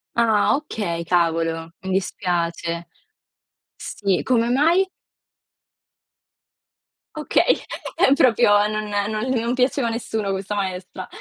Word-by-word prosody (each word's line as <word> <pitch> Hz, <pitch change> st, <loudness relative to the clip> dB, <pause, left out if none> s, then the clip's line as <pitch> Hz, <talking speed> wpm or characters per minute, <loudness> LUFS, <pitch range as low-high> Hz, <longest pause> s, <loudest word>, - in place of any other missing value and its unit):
Ah 225 Hz, -1 st, +3 dB
okay, 190 Hz, -, -4 dB
cavolo, 165 Hz, -1 st, 0 dB
mi 190 Hz, -, -4 dB
dispiace. 170 Hz, -2 st, -2 dB, 0.9 s
Sì, 195 Hz, -3 st, -2 dB
come 235 Hz, -2 st, +2 dB
mai? 335 Hz, +9 st, +3 dB, 2.3 s
Okay, 305 Hz, -, +2 dB, 0.4 s
ehm, 270 Hz, -, +5 dB
proprio 235 Hz, -6 st, +4 dB, 0.2 s
non 215 Hz, 0 st, -2 dB, 0.3 s
non 215 Hz, 0 st, -2 dB
l 260 Hz, -, -1 dB
non 235 Hz, +2 st, -1 dB
piaceva 255 Hz, -1 st, +1 dB
a -, -, 0 dB
nessuno 220 Hz, -3 st, -3 dB
questa 195 Hz, +2 st, -3 dB
maestra. 185 Hz, -1 st, -4 dB
205 Hz, 105 wpm, -22 LUFS, 175-240 Hz, 2.3 s, ehm